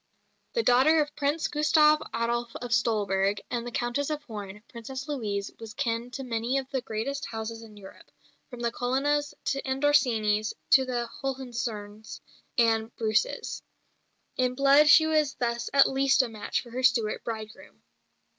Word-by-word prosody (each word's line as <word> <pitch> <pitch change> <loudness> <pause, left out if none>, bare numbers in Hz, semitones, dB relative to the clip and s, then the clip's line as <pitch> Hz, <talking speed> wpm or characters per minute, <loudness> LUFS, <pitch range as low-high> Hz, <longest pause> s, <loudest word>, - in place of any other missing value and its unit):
The 465 - +1
daughter 275 - +5
of 295 0 -1
Prince 295 +2 0
Gustav 305 0 +4
Adolf 235 0 -2
of 245 -1 -4
Stolberg 205 -4 +1
and 240 -1 -2
the - - -5
Countess 240 +5 -1
of 300 -1 -3
Horn, 210 -4 -8
Princess 260 +4 -7
Louise 210 -8 -3
was 220 -2 -9
kin 230 +1 -2
to 270 +2 -6
many 240 +1 -1
of 265 -1 -3
the 265 - -1
greatest 270 +4 -4
houses 225 0 -6
in 215 -2 -13
Europe, 195 -1 -14 0.4
from 245 -2 -9
the 235 -1 0
Colonnas 280 +5 0 0.3
and 265 +1 -3
Orsinis 220 -7 +2 0.2
to 265 -1 +6
the 240 -2 -2
Hohenzollerns 235 -6 -5 0.4
and 225 -1 +2
Bruces. 215 -1 -1 0.8
In 250 0 +1
blood 280 +2 +5
she 315 +1 +8
was 305 -3 +1
thus 235 -1 -2
at 275 0 +6
least 270 0 +3
a 250 - -4
match 215 -2 -3
for 240 - -14
her 255 +2 -3
Stuart 235 -4 +2
bridegroom. 220 -1 -8
240 Hz, 155 wpm, -27 LUFS, 225-275 Hz, 0.8 s, she